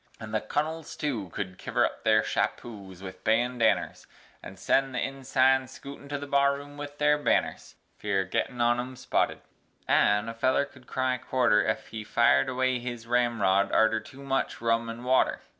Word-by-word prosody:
An' 110 -1 -8
th' 110 0 -3
Cunnles, 160 +1 -3
tu, 120 - -3
could 95 0 -6
kiver - - +1
up - - -5
their 110 -1 +4
shappoes 100 -5 -4
with 95 -1 -9
bandanners, 120 +1 +1 0.3
An' - - -10
sen 135 -1 +1
the - - -1
insines 130 -1 +1
skootin' 140 0 -11
to 145 - -2
the 145 - -6
barroom 140 +1 0
with 145 0 -8
their 150 0 +3
banners - - -1 0.2
(Fear 100 -2 0
o' - - -4
gittin' 125 +5 -2
on 120 +1 +3
'em 130 +1 -5
spotted), 125 - -1 0.5
an' 105 +2 +3
a 115 - -4
feller 130 +4 +1
could 130 -2 -19
cry 130 -1 -1
quarter, 125 -5 +2
Ef 110 - -2
he 110 -1 -6
fired 70 -9 +3
away 130 0 0
his 120 -1 -6
ramrod 115 -5 +2
artur 110 0 +3
tu 135 +4 -13
much 135 -1 -1
rum 115 0 0
an' 115 +1 -7
water. 130 +1 +2
125 Hz, 175 wpm, -27 LUFS, 110-135 Hz, 0.5 s, their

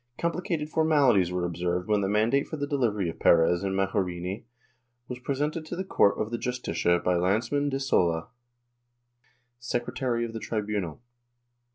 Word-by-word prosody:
Complicated 170 -2 -2
formalities 145 - +3
were 90 -1 -1
observed 90 +1 -2
when 105 -1 +2
the 95 - 0
mandate 110 +7 +2
for 155 - -5
the 145 - -2
delivery 115 -10 0
of 80 - -6
Perez 85 +2 +4
and 95 -1 -1
Majorini 95 0 -2 0.6
was 125 -1 -6
presented 145 +5 -2
to 175 - -4
the 190 - -3
court 100 - +3
of 110 +1 -2
the 120 - -2
Justicia 105 -8 0
by 90 +1 0
Lanceman 115 +11 +1
de 135 -1 -2
Sola, 85 -11 +1 1.3
secretary 120 0 -2
of 115 - -7
the 115 - -4
tribunal. 105 -5 -3
110 Hz, 155 wpm, -27 LUFS, 90-135 Hz, 1.3 s, Perez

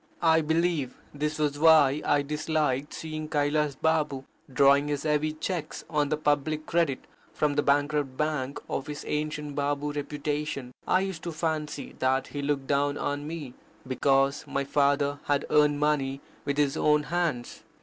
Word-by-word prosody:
I 160 -1 +5
believe 160 -3 0 0.2
this 150 +1 -2
was 145 -2 0
why 150 -3 +6
I 145 -1 +2
disliked 150 -2 -1
seeing 155 -1 -6
Kailas 145 -1 +1
Baba 150 -3 0 0.3
drawing 140 +2 +5
his 145 -1 -2
heavy 155 0 +1
cheques 160 +1 -4
on 150 -2 +1
the 155 - 0
public 150 +1 0
credit 165 -6 0 0.3
from 150 -1 +1
the 145 - +2
bankrupt 145 -1 +1
bank 150 -3 -1
of 135 - -3
his 150 -1 -6
ancient 150 -1 -3
Babu 145 +1 -1
reputation 145 -2 -3
I 185 - +3
used 190 -4 -4
to 170 - -4
fancy 155 -2 -3
that 130 +1 +1
he 145 - -4
looked 140 -1 -1
down 145 +1 +1
on 145 +1 -3
me, 155 -6 -6 0.3
because 135 +2 +2
my 140 - -1
father 140 0 +1
had 145 0 +1
earned 150 -1 +4
money 140 -2 +1 0.3
with 140 0 -1
his 145 -2 +2
own 150 0 +3
hands. 155 -6 -2
145 Hz, 160 wpm, -27 LUFS, 140-155 Hz, 0.3 s, why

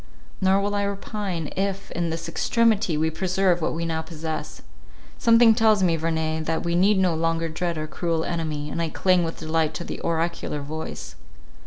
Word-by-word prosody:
Nor 190 +1 +4
will 205 +1 -1
I 205 - +1
repine 200 -4 -3
if 195 +1 -2
in 170 -1 -1
this 165 +1 -4
extremity 210 -2 +2
we 160 +1 +1
preserve 185 +1 +1
what 160 - -1
we 170 +1 -2
now 160 -1 -1
possess. 160 -1 -6 0.6
Something 230 0 +6
tells 220 -3 +4
me, 170 -2 +3
Verney, 160 -1 -1
that 160 +1 -2
we 170 0 -1
need 190 +4 +4
no 185 -3 +3
longer 165 +1 0
dread 170 +1 -2
our 155 - -2
cruel 165 +1 -1
enemy, 155 -3 -3
and 170 - -2
I 165 - -1
cling 185 +2 +2
with 165 0 -4
delight 160 -1 0
to 170 - -4
the - - -6
oracular 165 -3 -2
voice. 145 - -6
165 Hz, 185 wpm, -24 LUFS, 160-190 Hz, 0.6 s, Something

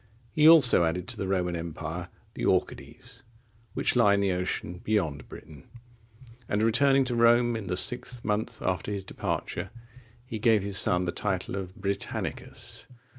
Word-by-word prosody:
He 155 +1 +5
also 135 - +7
added 85 +2 -2
to - - -4
the 95 - -3
Roman 90 -2 -1
empire 85 +1 -6 0.3
the - - -6
Orcades,(39) 115 - -2 0.5
which - - +2
lie 105 -5 +4
in - - 0
the 100 -1 +1
ocean 90 -1 -3
beyond 80 -10 -1
Britain, 75 -4 -13 0.8
and, 105 +1 0
returning 135 +4 +3
to 125 -1 -2
Rome 120 0 +4
in 110 -3 -5
the 90 - -2
sixth 125 +2 0
month 105 +1 -2
after 95 +2 -2
his 100 -1 -4
departure, - - -4 0.6
he 115 -3 -6
gave 110 -2 +3
his 100 -2 +2
son 90 0 +3
the 85 - -1
title 95 -1 -3
of 95 -1 -6
Britannicus. 100 -1 -5
100 Hz, 160 wpm, -27 LUFS, 90-115 Hz, 0.8 s, also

